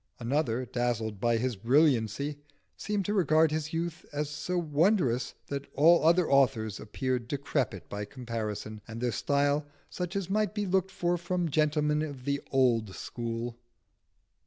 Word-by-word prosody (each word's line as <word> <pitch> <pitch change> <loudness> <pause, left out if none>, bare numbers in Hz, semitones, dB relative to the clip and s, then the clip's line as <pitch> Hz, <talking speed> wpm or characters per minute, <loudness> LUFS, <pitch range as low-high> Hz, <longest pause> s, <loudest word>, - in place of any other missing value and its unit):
Another, 125 -1 0
dazzled 115 -4 -2
by 120 +1 +2
his 125 +1 -1
brilliancy, 135 +3 +2 0.4
seemed 205 -2 -2
to 205 - 0
regard 160 -5 +4
his 155 0 -2
youth 170 +1 -3
as 150 0 -2
so 150 +4 -2
wondrous 150 - +1
that 140 0 -5
all 165 +4 +6
other 170 +2 +4
authors 125 -7 +2
appeared 125 +2 -2
decrepit 135 - -2
by 105 0 -4
comparison, 110 -2 -5
and 115 0 -7
their 120 0 0
style 145 +5 +1 0.3
such 180 +1 -4
as 195 -3 -1
might 210 +1 0
be 210 -1 -1
looked 190 0 +1
for 175 -1 -1
from 175 -1 -1
gentlemen 150 0 +2
of 140 -5 -5
the 140 0 0
old 115 -7 +2
school. 115 0 -5
140 Hz, 150 wpm, -29 LUFS, 120-165 Hz, 0.4 s, all